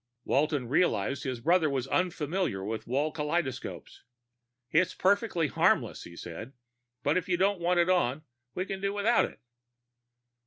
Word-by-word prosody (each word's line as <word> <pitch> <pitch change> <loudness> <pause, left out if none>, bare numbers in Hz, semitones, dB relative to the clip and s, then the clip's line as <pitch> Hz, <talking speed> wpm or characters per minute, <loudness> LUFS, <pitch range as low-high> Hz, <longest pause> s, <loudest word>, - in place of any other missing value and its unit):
Walton 145 -3 +1
realized 140 - +1
his 130 -3 -3
brother 165 +2 +3
was 135 -3 -1
unfamiliar 170 - -1
with 110 +2 -4
wall 145 +5 0
kaleidoscopes. 150 -3 -3 0.7
"It's 165 +3 +2
perfectly 200 -3 +2
harmless," - - +1
he 85 - -11
said. 105 +11 -8 0.5
"But 150 +5 +2
if 185 0 -3
you 175 - +2
don't 195 +1 +2
want 175 +1 +2
it 170 - +1
on, 155 -6 +1 0.3
we 185 - -1
can 195 -1 -5
do 200 0 -1
without 215 +4 +3
it." - - -11
160 Hz, 150 wpm, -29 LUFS, 130-185 Hz, 0.7 s, brother